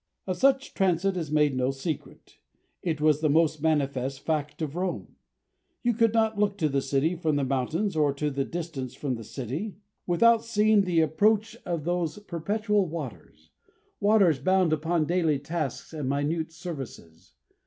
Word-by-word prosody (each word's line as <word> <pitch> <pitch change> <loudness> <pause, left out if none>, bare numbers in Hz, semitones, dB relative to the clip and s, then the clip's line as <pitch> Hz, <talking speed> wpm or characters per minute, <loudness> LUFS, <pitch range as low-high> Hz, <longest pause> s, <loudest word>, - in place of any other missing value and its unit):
Of 185 -2 -2
such 270 +5 +3
a - - -28
transit 190 0 +1
is 165 -4 -3
made 150 -2 +2
no 130 0 +1
secret. 135 +3 -6 0.4
It 160 -4 -2
was 155 -1 +3
the 155 - +2
most 155 0 +2
manifest 135 -4 0
fact 150 -2 -2
of 150 0 -4
Rome. 180 0 -3 0.7
You 240 -1 +2
could 230 0 +3
not 220 -2 +1
look 205 -1 +1
to 155 -5 +1
the 140 -1 +1
city 140 +5 +1
from 160 -3 0
the 145 - +1
mountains 140 +9 -1
or 150 -2 +3
to 150 +1 -1
the 135 0 -1
distance 155 -6 -5
from 140 -3 -2
the 115 -2 -6
city 140 - -5 0.3
without 230 +6 +4
seeing 215 -2 +3
the 170 -3 +3
approach 215 +8 +2
of 170 -4 -2
those 175 +1 -1
perpetual 205 +2 -1
waters 150 -8 -8 0.5
waters 200 -8 +4
bound 185 +2 +3
upon 160 +1 +1
daily 165 -3 +1
tasks 155 0 -4
and 150 -4 -3
minute 155 +4 -1
services. 135 - -9
160 Hz, 165 wpm, -27 LUFS, 145-190 Hz, 0.7 s, without